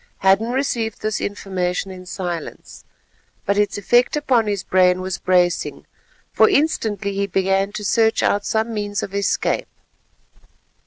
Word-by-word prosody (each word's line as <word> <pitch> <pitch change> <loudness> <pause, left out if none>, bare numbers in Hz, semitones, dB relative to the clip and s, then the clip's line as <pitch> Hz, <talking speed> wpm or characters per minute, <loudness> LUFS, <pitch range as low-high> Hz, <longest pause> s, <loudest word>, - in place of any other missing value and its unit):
Hadden 195 +4 +3
received 240 -5 -2
this 215 0 -1
information 190 -2 -3
in 185 -1 -11
silence, 175 -3 -6 0.6
but 200 - +1
its 205 0 +1
effect 240 +6 +2
upon 250 -7 +2
his 200 -2 -2
brain 185 -1 +3
was 185 0 -4
bracing, 180 -1 +1 0.5
for - - +5
instantly 220 - 0
he 200 0 -1
began 195 +1 +1
to 210 - -5
search 225 +2 +2
out 205 0 +1
some 220 +2 -1
means 205 -1 -3
of 195 - -6
escape. 200 0 0
200 Hz, 140 wpm, -20 LUFS, 185-220 Hz, 0.6 s, for